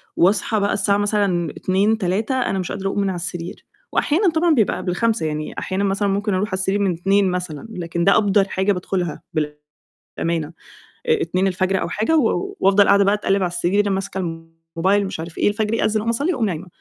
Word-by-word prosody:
وأصحى 200 +4 +2
بقى 200 0 +1
الساعة 200 0 +2
مثلًا 200 -5 0
14:00، 200 +4 +1
15:00 210 +5 -1
أنا 195 -5 -1
مش 180 - -4
قادرة 195 -1 -3
أقوم 195 - -1
من 195 - 0
على 185 - -3
السرير، 175 0 -6 0.3
وأحيانًا 355 +5 +2
طبعًا 325 0 +2
بيبقى 220 -6 +2
قبل 180 -1 -3
05:00 225 -5 0
يعني، 155 0 -4
أحيانًا 190 +1 -2
مثلًا 200 +1 0
ممكن 200 +1 0
أرُوح 190 +3 0
على 190 - -8
السرير 190 +2 0
من 195 -3 +1
02:00 195 +2 +2
مثلًا، 180 -1 -4
لكن 170 -3 -3
ده 200 - +5
أبدَر 205 -2 +3
حاجة 190 +1 +1
بادخلها 180 -2 -3 0.8
بالأمانة، 165 -2 -3 0.6
آآ 460 -3 +2
02:00 185 - 0
أو - - -2
حاجة، 225 +10 +1
و 390 - 0
وافضل 200 +1 +4
قاعدة 200 0 +5
بقى 200 +1 +3
اتقلّب 200 -1 0
على - - +2
السرير 190 +4 +1
ماسكة 195 0 -3 0.6
الموبايل 195 +4 +2
مش 190 - -5
عارف 165 0 -7
إيه، - - +2
الفجر 210 +1 0
يأذِّن 220 -1 +1
أقوم 225 +2 -2
أصلّي 285 +10 0
وأقوم 240 -7 0
نايمة، 180 -1 -4
195 Hz, 200 wpm, -21 LUFS, 180-210 Hz, 0.8 s, ده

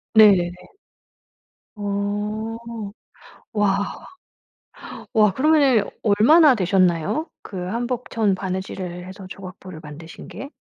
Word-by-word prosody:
네. 195 -5 +6 1.2
어. 210 +2 -3 1.0
와. 200 -1 0 1.1
와 210 -3 +4
그러면은 275 -4 +4 0.2
얼마나 255 +8 +6
되셨나요? 185 - +1 0.2
그 195 - -8
한복천 235 -1 -1
바느질을 185 -1 -5
해서 190 0 -10
조각보를 185 -3 -10
만드신 155 +2 -11
게? 275 - -8
200 Hz, 185 characters per minute, -22 LUFS, 185-225 Hz, 1.2 s, 네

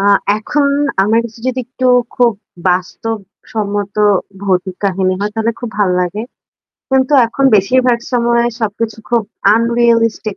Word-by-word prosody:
আ 195 - 0 0.3
এখন 280 +6 0 0.3
আমার 215 +3 +2
কাছে 230 -1 -9
যদি 255 0 -2
একটু 255 +1 -3 0.3
খুব 240 -2 +4 0.4
বাস্তবসম্মত 205 +2 -3 0.5
ভৌতিক 185 -1 -1
কাহিনী 190 -1 +1
হয় 205 +1 -1
তাহলে 225 +1 0
খুব 240 - -4
ভাল 200 -3 +2
লাগে। 180 +4 -2 0.7
কিন্তু 265 +1 +2
এখন 275 +4 -2
বেশিরভাগ 245 +5 +2
সময় 235 -1 +2 0.2
সবকিছু 220 0 -3
খুব 235 -2 +2 0.3
আনরিয়ালিস্টিক 230 -2 +1
225 Hz, 125 wpm, -15 LUFS, 200-235 Hz, 0.7 s, খুব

